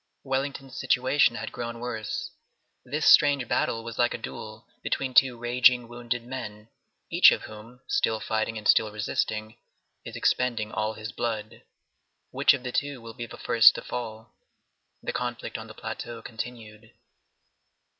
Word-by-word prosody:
Wellington's 135 0 -3
situation 130 -1 +3
had - - -5
grown 120 -1 -5
worse. 115 -3 -4 0.5
This 150 +5 -2
strange 140 -5 +6
battle 115 0 0
was 115 -1 -8
like 120 0 +2
a - - -4
duel 110 -1 -9
between 130 -2 -2
two 125 -2 +5
raging, 120 0 +3
wounded 120 0 -4
men, 110 -4 -7 0.4
each - - +8
of - - -1
whom, 110 +4 -12
still 190 - +1
fighting 110 +1 -2
and 105 - -4
still 110 - +4
resisting, 110 +1 -3 0.4
is - - -8
expending 115 -4 0
all 110 0 -1
his 110 +1 -7
blood. 110 -3 -4 0.7
Which - - +4
of 130 - -9
the 125 - -4
two 140 0 -2
will 115 -1 -10
be 120 -1 -6
the - - -11
first 110 -4 +6
to - - -6
fall? 110 -2 -6 0.7
The - - -3
conflict 120 -1 -4
on 110 0 -5
the 110 - -12
plateau 115 +1 -7
continued. 110 -2 -8
120 Hz, 155 wpm, -27 LUFS, 110-125 Hz, 0.7 s, each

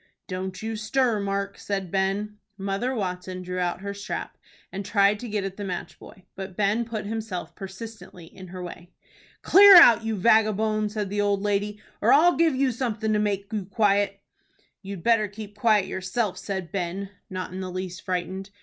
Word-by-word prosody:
"Don't 185 +1 -5
you 225 0 -3
stir, 220 +1 +1
Mark," 200 0 -3
said 195 -3 -3
Ben. 200 +2 -1 0.2
Mother 200 +6 -2
Watson 185 -3 -4
drew 180 0 -4
out 175 0 -1
her 200 0 -4
strap, 200 0 -5 0.4
and 195 +1 -5
tried 200 +1 +3
to 240 - -7
get 210 -1 -1
at 195 0 -5
the 205 - -5
match 185 -3 -5
boy, 190 - -14
but 190 -1 -7
Ben 210 +3 +1
put 220 -3 -5
himself 215 -4 -4
persistently 195 -2 -9
in 185 +3 -12
her 180 0 -7
way. 175 0 -9 0.5
"Clear 400 +1 +9
out, 235 -10 +9
you 225 -1 -1
vagabone!" 215 0 +2
said 210 -2 -4
the 205 0 0
old 200 -1 +1
lady, 205 0 -1 0.2
"or - - +4
I'll 345 +5 +6
give 330 -4 +3
you 265 0 +2
something 220 -3 -1
to 210 - +2
make 200 0 -2
you 205 -3 -2
quiet." 200 0 +1 0.6
"You'd 195 -3 -7
better 225 -2 +3
keep 205 0 -10
quiet 210 -2 +3
yourself," 190 +3 -2
said 190 -5 -5
Ben, 190 +1 -3 0.2
not 185 -1 -5
in 185 - -5
the 185 - -4
least 185 0 -5
frightened. 185 +1 -3
200 Hz, 185 wpm, -25 LUFS, 190-215 Hz, 0.6 s, Clear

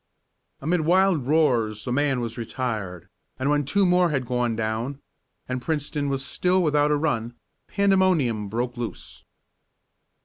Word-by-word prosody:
Amid 165 +4 +1
wild 175 -4 +3
roars 120 -9 +2
the 125 - -3
man 135 -1 +1
was 115 -1 -4
retired, 110 -7 -4 0.3
and 135 +2 0
when 145 0 +2
two 200 +8 +2
more 180 -1 +4
had 135 -4 -1
gone 120 -1 0
down, 115 +5 -3 0.5
and 130 0 -3
Princeton 145 -1 -2
was 135 0 -2
still 180 0 +1
without 150 -2 +2
a 150 - +3
run, 120 -6 -1 0.3
pandemonium 185 - +2
broke 120 +3 -3
loose. 120 -1 -7
135 Hz, 140 wpm, -24 LUFS, 120-160 Hz, 0.5 s, more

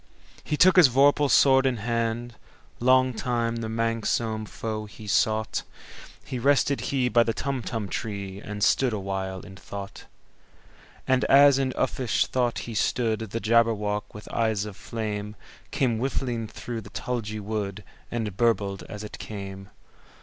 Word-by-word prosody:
He 150 - -2
took 185 +3 +6
his 170 -7 +8
vorpal 140 +3 +4
sword 135 0 +5
in 125 -2 0
hand:Long 120 +3 0
time 115 -1 -1
the 115 -1 -3
manxome 115 -1 -1
foe 110 -1 -4
he 105 +1 -12
sought—So 110 +4 -2
rested 140 +1 +2
he 130 -3 +1
by 120 -1 +4
the 115 -1 0
Tumtum 120 -6 -3
tree, 100 -1 -5
And 105 -1 -4
stood 130 -4 +3
awhile 95 -2 -3
in 100 -2 -12
thought. 100 0 -8 1.0
And 130 0 +3
as 140 0 +6
in 135 -1 0
uffish 125 -4 0
thought 125 -2 0
he 115 - -6
stood, 110 +1 0
The 110 0 -4
Jabberwock, 105 -2 +1
with 105 - -11
eyes 110 -3 +1
of 105 -2 -8
flame, 105 -1 -5 0.3
Came 120 -5 0
whiffling 120 -3 -2
through 115 +1 -6
the - - -12
tulgey 110 -4 -4
wood, 105 -1 -4 0.3
And 110 -5 -3
burbled 100 -4 +1
as 105 0 -7
it 105 - -8
came! 95 -2 -7
115 Hz, 140 wpm, -26 LUFS, 105-125 Hz, 1.0 s, his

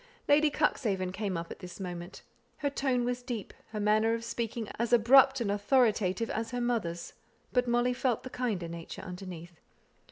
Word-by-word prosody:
Lady 300 +1 +5
Cuxhaven 210 -11 0
came 195 -2 -2
up 165 0 -5
at - - -8
this 180 -1 -9
moment. 175 -1 -6 0.3
Her 285 -1 -1
tone 260 -3 0
was 245 0 -1
as - - -19
deep, 240 -6 -5 0.2
her 215 - -5
manner 215 +2 +3
of 230 - -5
speaking 230 -1 -3
as 235 0 0
abrupt 265 +3 +6
and 205 -4 0
authoritative, 210 -1 +2
as 225 +1 -2
her 245 - -3
mother's, 220 -9 -2 0.4
but 250 -1 +2
Molly 240 +1 +2
felt 245 -2 0
the 255 - -8
kinder 215 -9 -2
nature 165 +2 -7
underneath. 180 -2 -8
225 Hz, 180 wpm, -30 LUFS, 185-245 Hz, 0.4 s, abrupt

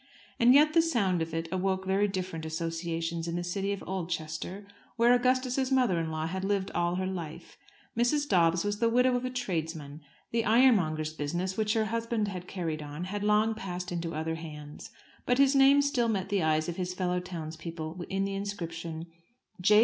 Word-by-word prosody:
And 245 +2 +7
yet 305 +2 +6
the 330 - +6
sound 200 - +1
of 165 0 -2
it 165 +1 -2
awoke 190 0 0
very 195 +2 +2
different 185 -4 -4
associations 165 +1 -3
in 170 - -2
the 175 - -2
city 195 +3 -2
of 200 - -4
Oldchester, 175 +1 -4 0.3
where 240 +1 +5
Augustus's 255 +1 +1
mother 250 -10 +3
in 165 -1 -2
law 155 0 -2
had 190 +3 -3
lived 195 -1 0
all 175 0 0
her 185 +1 -1
life. 175 -5 -6 0.4
Mrs. 265 +6 +2
Dobbs 170 -4 +3
was 205 0 -1
the 230 0 +3
widow 250 +2 +3
of 245 +1 -1
a - - -1
tradesman. 160 - -4 0.3
The 230 0 +1
ironmonger's 195 -11 +3
business, 175 +5 -2
which 215 0 +1
her 220 -1 +2
husband 230 -1 -1
had 180 -2 -6
carried 165 -5 -3
on, 150 +3 -6
had 205 +3 -4
long 210 +1 +3
passed 180 -4 -5
into 170 -2 -3
other 160 +1 -2
hands; 150 -2 -8 0.4
but 245 - +3
his 275 0 +5
name 275 +1 +6
still 275 -5 +1
met 195 -3 -1
the 200 -2 +1
eyes 155 0 +2
of 175 - -4
his 180 -1 -3
fellow 180 -1 0
townsmen 165 -1 -6
in 195 0 0
the 195 - -3
inscription, 170 -5 -5 0.6
"J. 210 +3 +6
185 Hz, 190 wpm, -29 LUFS, 165-220 Hz, 0.6 s, And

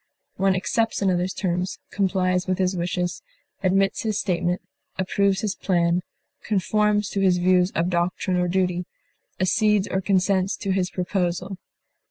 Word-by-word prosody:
One 195 0 +2
accepts 220 +4 0
another's 185 -1 +1
terms, 180 -1 -2
complies 185 -2 +1
with 185 -1 0
his 185 -1 +1
wishes, 175 0 -2 0.4
admits 195 +1 +2
his 215 -2 -1
statement, 180 -2 -1 0.3
approves 195 +1 +1
his 210 -2 -1
plan, 175 -1 +1 0.4
conforms 210 0 +1
to 200 - -2
his 185 -2 +4
views 180 0 +3
of 170 +2 +1
doctrine 180 +2 0
or 180 0 +1
duty, 180 -1 0 0.5
accedes 205 +2 +2
or 190 - -1
consents 190 0 +1
to 200 -3 -2
his 185 -1 0
proposal. 180 0 -2
185 Hz, 140 wpm, -24 LUFS, 180-195 Hz, 0.5 s, his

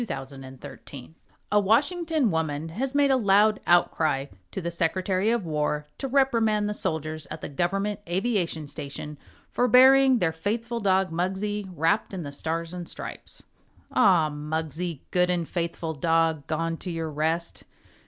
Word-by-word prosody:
THE 235 - -3
FLAG 135 -5 -5
AND 130 0 -11
THE - - -7
FAITHFUL 135 +1 -11 0.4
(A 210 - +5
Washington 290 - +2
woman 160 -1 -2
has 260 - -3
made 285 -1 +4
a - - +5
loud 210 -1 +4
outcry 160 -5 +2 0.2
to - - -5
the 170 -2 -3
Secretary 185 +4 0
of 230 -5 0
War 150 -1 -1
to 270 - -2
reprimand 230 -6 +2
the 210 - -1
soldiers 155 -4 -2
at 155 - -7
the - - -5
Government 195 +7 -1
Aviation 180 -5 -1
Station 145 +1 -7 0.3
for 245 - +2
burying 265 +1 +7
their 175 -7 +1
faithful 225 +8 -3
dog, 190 -3 +2
Muggsie, 190 +4 -2
wrapped 165 +6 +1
in 180 - -4
the 145 - -6
Stars 165 +3 -3
and 175 -1 -6
Stripes.) - - -9 0.5
Ah, 165 -5 +4
Muggsie, 160 +1 -3
good 180 0 +2
and 175 -2 0
faithful 170 -2 -3
dog, 160 -1 +1
Gone 165 +1 -1
to 185 - -6
your 165 -2 -3
rest! 160 +3 -1
175 Hz, 165 wpm, -26 LUFS, 160-210 Hz, 0.5 s, burying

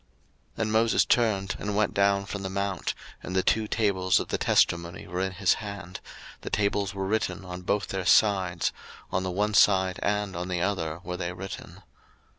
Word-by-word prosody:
02:032:015 - - -4
And 110 - -1
Moses 115 +1 +3
turned, 100 -5 +1
and 105 0 -3
went 105 0 +1
down 100 0 +2
from 100 0 -5
the 95 - -4
mount, 100 -1 -2 0.3
and 90 - -6
the 95 - +3
two 110 -1 +2
tables 95 -5 +2
of - - -5
the - - -1
testimony 85 +1 +1
were 90 +2 -3
in 95 0 -1
his 95 -1 +3
hand: 100 -4 -7 0.4
the - - -5
tables 100 -1 0
were 95 0 -2
written 100 -1 -1
on 90 0 -7
both 100 +3 -1
their 95 -1 -2
sides; 95 -5 +3 0.4
on 95 - 0
the 95 - -2
one 105 +4 0
side 95 -2 +4
and 105 -2 -1
on 90 +1 -3
the 90 -1 -2
other 85 -4 -2
were 90 0 -4
they 90 -1 -3
written. 95 +1 -8
95 Hz, 195 wpm, -27 LUFS, 90-105 Hz, 0.4 s, side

